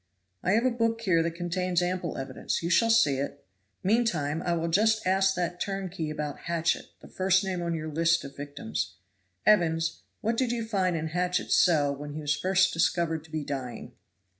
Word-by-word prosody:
"I 185 - +1
have 230 +3 +3
a 255 - +3
book 230 -1 0
here 180 -7 +3
that 165 0 -2
contains 175 0 -1
ample 180 -2 -2
evidence; 135 +4 -3
you 170 - -1
shall 230 +5 +4
see 190 -12 +4
it. 140 +1 -5 0.4
Meantime 180 -9 +1
I 175 - 0
will 165 0 -1
just 220 +5 +2
ask 190 +1 +3
that 175 0 -2
turnkey 190 -5 -3
about 150 -2 -4
Hatchett, 170 0 0
the - - -12
first 190 +1 +2
name 185 -2 -2
on 170 -1 -1
your 155 -1 -4
list 165 +1 +2
of 140 - -9
victims. 115 -8 -4 0.5
Evans, 165 -5 +3 0.2
what 225 +2 0
did 255 -1 +1
you 235 -2 -2
find 190 -5 0
in 160 0 -2
Hatchett's 180 +2 0
cell 145 -5 +3
when 145 +1 -7
he 155 - -5
was 150 0 +1
first 190 +3 +2
discovered 165 -1 +1
to 160 - -18
be 155 -1 -2
dying?" 130 -4 -5
170 Hz, 190 wpm, -28 LUFS, 155-190 Hz, 0.5 s, shall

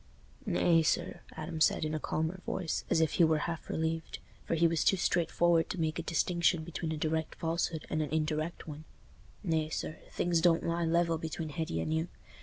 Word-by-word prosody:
"Nay, 165 -2 +4
sir," 155 - 0
Adam 155 0 -5
said, 155 - +4
in 155 - -2
a 155 - -1
calmer 160 +5 -2
voice, 175 -4 -2
as 165 - +3
if 160 - +2
he 175 - +4
were 160 -1 +4
half 165 -1 -5
relieved—for 160 +1 -3
he 165 +1 +3
was 165 -1 +1
too 195 - +4
straightforward 170 -1 +2
to 185 - -4
make 160 0 0
a - - 0
distinction 170 0 +1
between 165 0 -4
a 160 - -2
direct 160 +1 -1
falsehood 165 -1 -2
and 155 - -1
an 150 - -2
indirect 155 +2 -2
one—"Nay, 155 +1 -5
sir, 155 - -4
things 170 -2 +1
don't 170 -1 +3
lie 170 0 0
level 165 0 +2
between 160 0 -4
Hetty 150 - -3
and 155 - -1
you. 160 +1 0
160 Hz, 190 wpm, -31 LUFS, 155-170 Hz, -, Nay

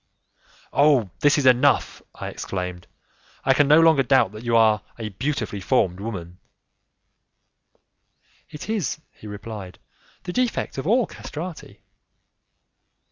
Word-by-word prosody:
"Oh! 140 - +3
this 145 0 +4
is 145 - 0
enough," 130 +2 +3
I - - -6
exclaimed; 90 -2 -5 0.6
"I 135 - +5
can 145 +1 +3
no 150 +2 +7
longer 160 -4 +5
doubt 130 -6 +3
that 110 +2 -10
you 120 -1 +2
are 110 -2 +4 0.2
a 110 -2 -5
beautifully 110 -2 -3
formed 95 -5 +1
woman!" 90 -5 -6 2.1
"It 150 - -9
is," 210 -9 -2
he 105 - -13
replied, 105 -2 -8 0.5
"the 180 - -5
defect 250 - -1
of 135 - -4
all 235 +3 +3
castrati." 165 +2 -8
125 Hz, 125 wpm, -23 LUFS, 105-150 Hz, 2.1 s, no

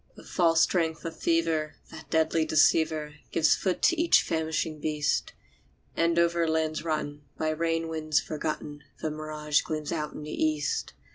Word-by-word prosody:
The - - -13
false 165 -2 +2
strength 165 -3 +1
of 165 -1 -4
fever, 165 -2 0 0.2
that 160 -3 -11
deadly 160 0 +2
deceiver, 155 -1 +2
Gives 160 -1 +4
foot 185 -2 -2
to 345 -2 +4
each 335 - +5
famishing 160 -1 -2
beast; 150 -1 -1 0.6
And 170 0 +2
over 170 0 +2
lands 160 -1 0
rotten, 150 -2 -3 0.2
by 155 - 0
rain 165 +1 -1
winds 155 -2 0
forgotten, 150 -1 -5 0.2
The 155 - -2
mirage 150 -1 -1
gleams 155 -1 -4
out 150 -2 -3
in 150 - -8
the 150 - -7
east. 155 -2 -1
155 Hz, 155 wpm, -28 LUFS, 155-165 Hz, 0.6 s, each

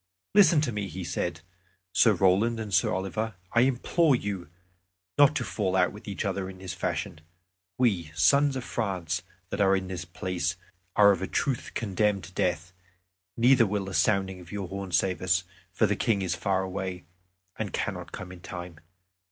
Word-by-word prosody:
"Listen 170 -7 +6
to 145 -5 0
me," 105 -2 -3
he 95 +1 -6
said, 85 -1 -3 0.5
"Sir 110 - +5
Roland 100 +5 +3
and 105 -3 -5
Sir 90 - +3
Oliver. 100 +3 -2 0.2
I 115 - +5
implore 135 +4 +3
you 100 -8 -4 0.7
not 145 +1 +6
to - - 0
fall 95 -3 -1
out - - +3
with - - -12
each - - -3
other 95 -1 -2
in 95 - -10
this 95 -3 -6
fashion. 80 - -3 0.6
We, 95 -11 +1
sons 140 - +4
of 130 - -3
France, 95 -7 -2 0.3
that - - -1
are 95 -1 +5
in 95 -1 -3
this 90 -1 -4
place, 85 -1 -2 0.4
are 100 -1 +7
of 95 - -1
a 95 - -2
truth 135 -4 -2
condemned 105 -1 0
to 95 - -10
death, 90 0 -1 0.6
neither 120 -1 +5
will 100 0 -1
the 95 - -6
sounding 95 +2 +1
of 90 -1 -13
your 100 -2 -4
horn 95 -1 -5
save 90 -1 +1
us, 95 0 +2 0.3
for 100 - +2
the 105 0 +1
King 100 -3 +1
is 90 -2 0
far 95 +1 0
away, 95 -1 -4 0.6
and - - -2
cannot - - -3
come 90 - -7
in 90 - -10
time. 90 -1 -8
95 Hz, 185 wpm, -28 LUFS, 90-110 Hz, 0.7 s, are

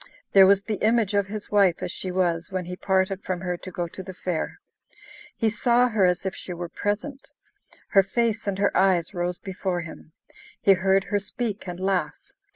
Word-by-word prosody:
There 195 -1 +8
was 200 0 +4
the 210 -1 -4
image 220 -2 +2
of 200 -1 +2
his 210 +1 -7
wife 195 -4 +3
as - - -3
she 185 - -5
was 175 -2 0
when 185 -2 -2
he 180 +1 -6
parted 190 0 0
from 180 -1 -3
her 180 -1 -2
to 185 - -9
go 175 -1 -3
to 190 - -8
the 190 0 -9
fair. 175 -3 -3 0.8
He 225 -2 +1
saw 240 +2 +3
her 210 -5 +3
as 180 +1 0
if 190 - -1
she 180 - -7
were 175 0 -5
present; 255 +11 -3 0.6
her 195 - +6
face 225 +2 -1
and 195 -1 -1
her 200 0 +1
eyes 185 -3 +2
rose 175 0 -2
before 185 -2 -3
him; 160 -1 -11 0.5
he 195 - +5
heard 190 +1 +2
her 205 - -1
speak 210 0 -4
and 175 0 -6
laugh. 185 -6 0
190 Hz, 200 wpm, -25 LUFS, 180-205 Hz, 0.8 s, There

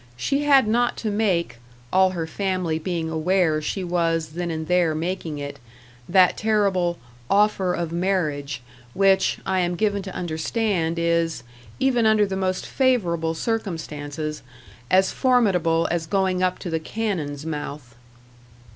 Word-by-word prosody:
She 275 - 0
had 275 -5 +5
not 240 +2 +1
to 215 - -2
make 190 - 0 0.4
all 190 0 +5
her 165 - -1
family 180 -2 -2
being 165 -1 -3
aware 160 -1 +1
she 185 +5 -3
was 165 -2 0
then 170 +2 -4
and 160 -1 -4
there 175 -3 +2
making 165 -1 -3
it 145 0 -6 0.5
that 185 0 +5
terrible 195 -5 +1 0.3
"offer 200 -3 +2
of 170 -2 -3
marriage," 155 -7 -1 0.3
which, 195 0 +3
I 190 - +1
am 175 -1 0
given 205 +1 0
to 190 -1 -8
understand, 170 +1 -1
is, 170 -4 0 0.4
even 250 -4 +3
under 215 -1 +4
the 195 -1 -3
most 185 -1 -1
favourable 175 -12 +1
circumstances, 155 -7 -4 0.5
as 190 +1 +4
formidable 185 - +2
as 170 -2 -1
going 190 -1 +1
up 185 0 +1
to 175 - -3
the 160 - 0
cannon's 160 -7 -3
mouth. 145 -5 -6
180 Hz, 140 wpm, -23 LUFS, 160-195 Hz, 0.5 s, had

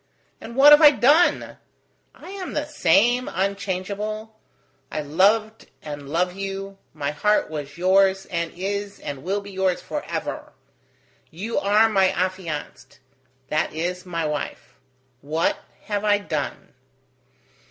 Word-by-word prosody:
And 235 - -9
what 280 +3 +8
have 295 +2 +9
I 300 - +10
done? 290 +6 +3 0.6
I - - -11
am 390 -2 -6
the 295 - -1
same, 245 - +2
unchangeable. 200 +3 -3 0.6
I 155 - -2
loved 205 +9 +1 0.2
and 145 -2 -7
love 180 +4 0
you: 195 0 -6
my 145 -2 -3
heart 210 +4 +1
was 145 -1 -6
yours, 190 +1 +3
and 170 -1 -2
is, 200 +2 -4
and 140 -2 -6
will 195 +4 -1
be 200 0 -11
yours 190 -1 0
forever. - - -5 0.8
You 205 +8 -3
are 205 +3 +4
my 195 -4 +3
affianced 180 -6 -4 0.5
that 155 0 -1
is, 180 +3 -3
my 170 -3 -3
wife. 150 -1 -5 0.5
What 155 +4 0 0.2
have 205 -1 -3
I 205 -1 +4
done?" 155 -8 -5
195 Hz, 130 wpm, -23 LUFS, 170-210 Hz, 0.8 s, I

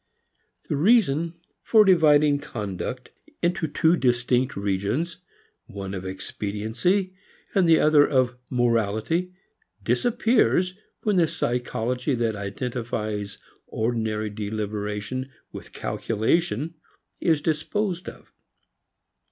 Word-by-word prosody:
V - - -33
The 145 - 0
reason 170 - +3 0.3
for 215 -2 +5
dividing 150 -5 +5
conduct 120 0 -5 0.3
into 175 -2 +1
two 160 +3 +3
distinct 125 -2 +1
regions, 100 - -1 0.5
one 100 -1 -6
of 95 -1 -5
expediency 110 - -2 0.4
and 185 -4 +3
the 160 - +6
other 150 -1 +5
of 130 -2 +2
morality, 120 - +1 0.5
disappears 190 - +2 0.3
when 210 -3 +2
the 170 -2 +4
psychology 125 +1 -1
that 115 -2 0
identifies 105 -1 -4 0.3
ordinary 110 -2 -1
deliberation 105 +4 -4 0.2
with - - -9
calculation 155 +7 -1 0.5
is 160 -3 +2
disposed 175 +5 -1
of. - - -16
125 Hz, 95 wpm, -25 LUFS, 110-165 Hz, 0.5 s, the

